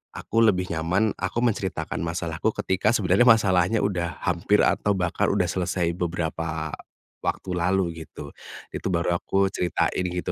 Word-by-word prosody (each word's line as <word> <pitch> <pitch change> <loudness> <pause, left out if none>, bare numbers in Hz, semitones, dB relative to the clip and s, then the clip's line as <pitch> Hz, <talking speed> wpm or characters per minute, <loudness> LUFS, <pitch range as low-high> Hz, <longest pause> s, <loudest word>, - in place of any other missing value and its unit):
aku 115 - -5
lebih 90 -5 +2
nyaman 90 +7 +1
aku 95 +4 -3
menceritakan 100 -5 -1
masalahku 85 +2 -2 0.2
ketika 95 +3 +1
sebenarnya 100 +4 +3
masalahnya 95 -2 +4
udah 90 -4 -2
hampir 90 +4 +2
atau 105 - +1
bahkan 90 -2 0
udah - - +2
selesai 90 -2 -1
beberapa 80 -3 -3 0.5
waktu 95 - -2
lalu 85 -2 0
gitu, 70 -1 -10 0.4
itu - - -4
baru 85 0 +1
aku 95 0 +1
ceritain 90 0 0
gitu 90 0 -3
90 Hz, 140 wpm, -25 LUFS, 85-95 Hz, 0.5 s, masalahnya